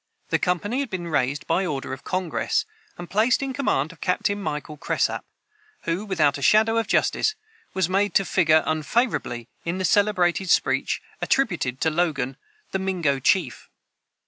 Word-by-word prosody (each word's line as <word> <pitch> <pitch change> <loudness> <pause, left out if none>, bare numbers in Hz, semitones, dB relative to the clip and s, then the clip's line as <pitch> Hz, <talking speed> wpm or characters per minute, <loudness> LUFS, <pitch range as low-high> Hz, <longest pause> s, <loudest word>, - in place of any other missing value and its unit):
The - - +2
company 205 +7 0
had 280 -3 -2
been 175 -3 -4
raised 140 -1 0
by 175 +3 +1
order 140 -6 -3
of 135 - -8
Congress, 185 - -1 0.3
and 175 - -7
placed 225 +8 +2
in 270 -1 -3
command 165 - 0
of 165 - -18
Captain 205 +2 0
Michael 150 -3 -4
Cresap, 145 - -1 0.6
who, 170 +5 -2
without 155 -7 +2
a - - -9
shadow 220 +9 +4
of 225 - -2
justice, 430 - +1 0.4
was 190 -3 +2
made 200 +2 +1
to 195 - +4
figure 160 -2 +4
unfavorably 155 - -1 0.2
in 170 +2 -2
the 185 - -1
celebrated 190 -3 +2
speech - - +1 0.2
attributed 175 - 0
to 160 - +2
Logan, 155 -5 -1 0.3
the 190 - -1
Mingo 175 -8 0
chief. 145 -2 +1
180 Hz, 160 wpm, -24 LUFS, 155-205 Hz, 0.6 s, shadow